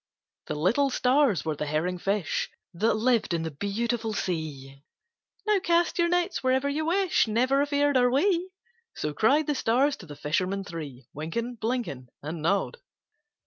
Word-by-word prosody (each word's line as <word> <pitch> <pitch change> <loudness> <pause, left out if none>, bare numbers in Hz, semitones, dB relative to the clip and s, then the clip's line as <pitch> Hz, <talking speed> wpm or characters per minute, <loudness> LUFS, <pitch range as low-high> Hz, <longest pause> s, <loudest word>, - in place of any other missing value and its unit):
The - - -3
little 220 - +2
stars 255 - +2
were 155 -1 -1
the 150 - -4
herring 170 +5 -1
fish 195 -1 -1 0.2
That 215 +7 +2
lived 225 -5 +2
in 165 - -2
that 160 -3 -6
beautiful 225 +2 -1
sea 145 -7 -4 0.6
"Now 425 -2 +3
cast 345 0 +1
your 340 - +4
nets 355 0 0
wherever 260 +2 +2
you 305 +3 -1
wish 370 -5 +2
Never 255 +5 +2
afeard 285 0 +2
are 245 -1 +4
we"; 350 +7 +2 0.5
So 150 - -3
cried 280 - +3
the 295 - 0
stars 270 +3 +2
to 180 - -12
the 145 - -9
fishermen 185 +7 -1
three: 150 -9 -8
Wynken, 230 - -3
Blynken, 225 - -3 0.2
And 155 +2 -5
Nod. 200 - 0
225 Hz, 160 wpm, -27 LUFS, -, 0.6 s, your